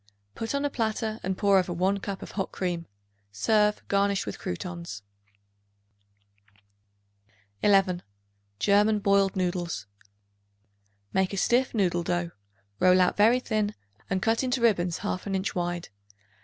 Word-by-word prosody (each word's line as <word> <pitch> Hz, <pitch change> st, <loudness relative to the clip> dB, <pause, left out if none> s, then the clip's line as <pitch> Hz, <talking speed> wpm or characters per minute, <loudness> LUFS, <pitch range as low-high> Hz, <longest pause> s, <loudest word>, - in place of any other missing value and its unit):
Put 225 Hz, +4 st, -3 dB
on 280 Hz, +1 st, 0 dB
a -, -, +1 dB
platter 220 Hz, -2 st, -2 dB
and 190 Hz, 0 st, -2 dB
pour 200 Hz, -2 st, +4 dB
over 180 Hz, -1 st, -2 dB
1 190 Hz, +3 st, +1 dB
cup 195 Hz, -1 st, -5 dB
of -, -, -9 dB
hot 195 Hz, -2 st, -3 dB
cream. 175 Hz, -2 st, -3 dB, 0.4 s
Serve, 210 Hz, -, +1 dB
garnished 200 Hz, 0 st, +1 dB
with 100 Hz, -, -6 dB
croutons. 170 Hz, -, -6 dB, 2.6 s
11. 195 Hz, -3 st, +3 dB, 0.6 s
German 210 Hz, -, +3 dB
Boiled 200 Hz, -1 st, +2 dB
Noodles. 175 Hz, -, -2 dB, 1.3 s
Make 190 Hz, 0 st, +1 dB
a -, -, -3 dB
stiff 245 Hz, +5 st, +2 dB
noodle 180 Hz, -4 st, +1 dB
dough; 175 Hz, 0 st, -1 dB, 0.5 s
roll 185 Hz, 0 st, +5 dB
out 180 Hz, -, +3 dB
very 225 Hz, +4 st, +5 dB
thin 215 Hz, -4 st, -1 dB, 0.3 s
and 190 Hz, -1 st, -1 dB
cut 225 Hz, +3 st, +2 dB
into 255 Hz, 0 st, 0 dB
ribbons 180 Hz, -7 st, +2 dB
half 185 Hz, -, -4 dB
an 195 Hz, -, -1 dB
inch 190 Hz, +2 st, -1 dB
wide. 175 Hz, -1 st, -3 dB
195 Hz, 135 wpm, -27 LUFS, 180-210 Hz, 2.6 s, roll